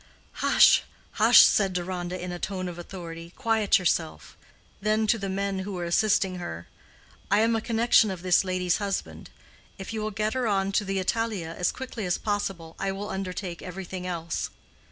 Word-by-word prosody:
"Hush, - - +6 0.3
hush!" - - +7
said 195 -3 +4
Deronda, 180 0 -3
in 180 0 -5
a 175 - -5
tone 185 -1 -3
of 175 -1 -7
authority; 170 -2 -8
"quiet 225 -5 +2
yourself." 170 -3 -2 0.5
Then 215 +1 +1
to 225 +1 +2
the 195 0 -3
men 195 0 -2
who 195 +1 -5
were 175 -2 -3
assisting 190 +1 +2
her, 85 - -7 0.6
"I 205 +2 +4
am 225 +1 +3
a 225 - 0
connection 230 -1 +3
of 185 -2 -6
this 180 0 +4
lady's 185 -2 0
husband. 200 -2 -4 0.5
If 195 +3 -7
you 220 - -3
will 215 - -2
get 215 +1 -2
her 255 -2 0
on 195 -2 +1
to 205 +1 +1
the 195 0 -2
Italia 190 -4 -1
as 180 - 0
quickly 250 -6 -6
as 175 - +1
possible, 195 -6 -3
I 195 0 -1
will 200 +2 -5
undertake 185 -2 -5
everything 185 0 -6
else." 170 -2 -3
195 Hz, 180 wpm, -26 LUFS, 180-210 Hz, 0.6 s, hush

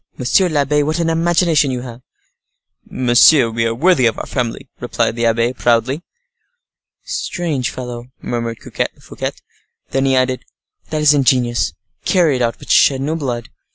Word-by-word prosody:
monsieur 175 +9 +2
l'abbe, 150 -1 +1
what 155 +3 -1
an 165 -1 0
imagination 165 -2 +2
you 125 -1 -3
have!" 120 -1 -9 0.9
"Monsieur, 125 +1 +5
we 115 0 0
are 115 - -2
worthy 155 -2 +3
of 115 - -1
our - - -5
family," 125 +1 -3
replied 115 -2 -1
the 115 0 +1
abbe, 115 +2 +1
proudly. 120 +4 +1 1.0
"Strange 150 -8 -3
fellow," 120 -1 -7
murmured 115 -1 -4
Fouquet. - - -4 0.6
Then 135 0 +1
he 135 -1 +2
added, 130 0 0 0.5
"That 155 -1 -2
is 150 0 +6
ingenious. 125 -4 +1 0.3
Carry 165 -7 +2
it - - -4
out, 115 -1 0
but - - -7
shed 135 -2 +5
no 150 +4 -2
blood." 125 -7 -4
130 Hz, 155 wpm, -17 LUFS, 120-150 Hz, 1.0 s, is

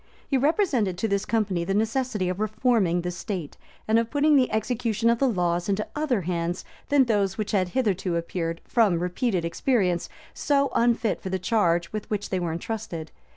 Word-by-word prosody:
He 275 - 0
represented 265 - +1
to 225 - 0
this 200 -1 0
company 205 -6 0
the 195 +3 -1
necessity 220 -2 0
of 180 +1 -2
reforming 215 -5 +1
the 175 +1 -3
state, 175 -2 -5 0.3
and 220 +1 +4
of 230 0 -1
putting 300 +1 +3
the 260 -3 +3
execution 230 0 +1
of 235 - 0
the 270 - +3
laws 175 -3 0
into 200 +2 0
other 290 -8 0
hands 170 0 -2 0.2
than 285 -2 +5
those 205 -5 0
which 215 -2 -2
had 185 -3 +1
hitherto 190 -7 0
appeared, 165 0 -3
from 215 -7 +3
repeated 180 +1 -1
experience, 180 -2 0 0.2
so 280 -1 +1
unfit 235 -2 +1
for 190 - -5
the 190 - 0
charge 175 -3 +1
with 215 -1 -5
which 205 -1 -3
they 185 - +1
were 175 -2 -2
intrusted. 170 -3 -5
205 Hz, 185 wpm, -25 LUFS, 175-235 Hz, 0.3 s, than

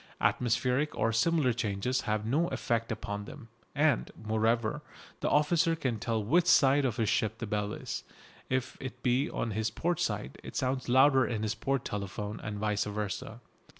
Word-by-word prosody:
Atmospheric 125 +4 +1
or 115 0 +1
similar 135 +2 +3
changes 115 +2 -1
have 105 0 0
no 150 +9 +2
effect 115 -6 -1
upon 105 -2 -4
them. 120 0 -11 0.3
And, 145 -3 +2
moreover, 110 +5 0 0.4
the - - 0
officer 165 +2 +3
can 130 -8 -2
tell 110 0 -1
which 170 +11 +3
side 140 -4 +5
of 120 -4 -1
his 115 -3 +1
ship 110 +2 +1
the 120 - -4
bell 105 -1 -1
is. - - -5 0.5
If 130 -1 -1
it 130 -2 -7
be 125 +3 +2
on 115 - -2
his 110 +1 -1
port 170 +9 -1
side 65 - -2
it - - -9
sounds 130 -1 -1
louder 130 +1 +5
in 110 -3 -2
his 110 -1 0
port 135 +3 -1
telephone, 105 +1 -4
and 105 0 -5
vice 105 0 0
versa. 105 -1 -4
115 Hz, 175 wpm, -30 LUFS, 110-135 Hz, 0.5 s, side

